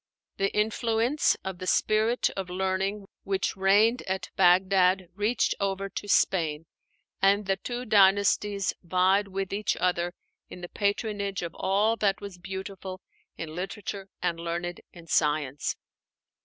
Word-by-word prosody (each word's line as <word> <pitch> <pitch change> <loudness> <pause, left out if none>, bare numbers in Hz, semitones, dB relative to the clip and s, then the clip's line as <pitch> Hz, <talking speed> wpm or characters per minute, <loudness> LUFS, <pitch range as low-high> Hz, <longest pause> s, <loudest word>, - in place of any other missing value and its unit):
The 195 0 +1
influence 225 +5 +1
of 190 -2 -5
the 185 - -6
spirit 220 +5 +2
of 190 -2 -5
learning 190 +2 -1 0.2
which 195 -1 -1
reigned 205 +5 +4
at 190 0 -3
Bagdad 185 0 +4
reached 210 +5 +1
over 195 0 -1
to 205 - -6
Spain, 160 -6 +2 0.6
and 200 +1 +4
the 195 0 0
two 245 +4 -5
dynasties 200 -1 +3
vied 185 +3 +2
with 195 0 -4
each 205 0 -1
other 175 0 0 0.3
in 180 - -10
the 175 - -7
patronage 200 -2 -1
of 170 -1 -5
all 210 +4 +1
that 200 -3 +1
was 200 -3 -9
beautiful 190 0 -7 0.4
in 160 -1 -6
literature 195 +2 -5
and 170 -2 0
learned 170 +1 -4
in 170 -2 -13
science. 150 -3 0
195 Hz, 135 wpm, -27 LUFS, 180-205 Hz, 0.6 s, reigned